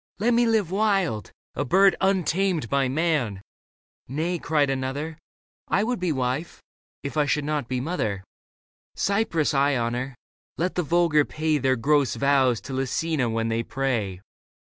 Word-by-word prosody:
Let 235 Hz, +4 st, +2 dB
me 235 Hz, 0 st, +3 dB
live 215 Hz, -6 st, +1 dB
wild, 195 Hz, -, +1 dB, 0.2 s
A -, -, -1 dB
bird 195 Hz, +7 st, +4 dB
untamed 190 Hz, -, +1 dB
by 140 Hz, -1 st, +2 dB
man! 145 Hz, -, 0 dB, 0.3 s
" -, -, -
" -, -, -60 dB
Nay," 165 Hz, +6 st, -2 dB
cried 145 Hz, -4 st, +1 dB
another, 140 Hz, +4 st, -3 dB, 0.2 s
*' -, -, -81 dB
I 205 Hz, -, +2 dB
would 245 Hz, +1 st, -1 dB
be 180 Hz, -2 st, 0 dB
wife, 130 Hz, +3 st, -2 dB, 0.4 s
if 140 Hz, +2 st, -5 dB
I 150 Hz, -1 st, +3 dB
should 150 Hz, 0 st, 0 dB
not 150 Hz, -4 st, -2 dB
be 130 Hz, 0 st, -2 dB
mother. 115 Hz, -, -2 dB
Leda -, -, -43 dB
Cypris 195 Hz, -7 st, +1 dB
I 140 Hz, 0 st, +3 dB
honour; 120 Hz, +3 st, -2 dB, 0.4 s
let 180 Hz, +2 st, -1 dB
the 180 Hz, -, 0 dB
vulgar 165 Hz, -2 st, +3 dB
pay 155 Hz, 0 st, -1 dB
Their 130 Hz, 0 st, +2 dB
gross 140 Hz, +2 st, +2 dB
vows 135 Hz, -4 st, +3 dB
to 135 Hz, -, -7 dB
Lucina 135 Hz, +1 st, -1 dB
when 115 Hz, 0 st, -1 dB
they 115 Hz, 0 st, 0 dB
pray. 115 Hz, -8 st, -2 dB
145 Hz, 165 wpm, -25 LUFS, 130-175 Hz, 0.4 s, bird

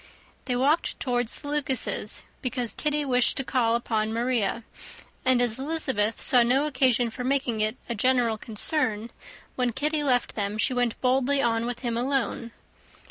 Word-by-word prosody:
They 250 Hz, -, -1 dB
walked 285 Hz, +6 st, +1 dB
towards 245 Hz, -3 st, -1 dB
the 290 Hz, -, -10 dB
Lucases', 270 Hz, -7 st, -1 dB, 0.2 s
because 250 Hz, -2 st, -2 dB
Kitty 300 Hz, -1 st, -1 dB
wished 250 Hz, -2 st, +2 dB
to 270 Hz, -, -1 dB
call 235 Hz, -3 st, +1 dB
upon 220 Hz, -2 st, -1 dB
Maria; 235 Hz, -1 st, -1 dB, 0.6 s
and 255 Hz, -1 st, +3 dB
as 245 Hz, -1 st, +1 dB
Elizabeth 265 Hz, -8 st, -1 dB
saw 250 Hz, -, +7 dB
no 255 Hz, +5 st, +2 dB
occasion 255 Hz, -4 st, +2 dB
for 250 Hz, -, -6 dB
making 255 Hz, -4 st, 0 dB
it 215 Hz, +4 st, 0 dB
a 235 Hz, -, -2 dB
general 235 Hz, -1 st, +1 dB
concern, 225 Hz, -1 st, -1 dB, 0.4 s
when 250 Hz, -2 st, 0 dB
Kitty 300 Hz, +4 st, -1 dB
left 250 Hz, -3 st, +1 dB
them 205 Hz, 0 st, -2 dB
she 235 Hz, -, +1 dB
went 245 Hz, -2 st, -1 dB
boldly 265 Hz, +2 st, +2 dB
on 230 Hz, -2 st, +1 dB
with 245 Hz, -1 st, -5 dB
him 235 Hz, -2 st, -2 dB
alone. 250 Hz, -2 st, -1 dB
245 Hz, 160 wpm, -26 LUFS, 230-265 Hz, 0.6 s, saw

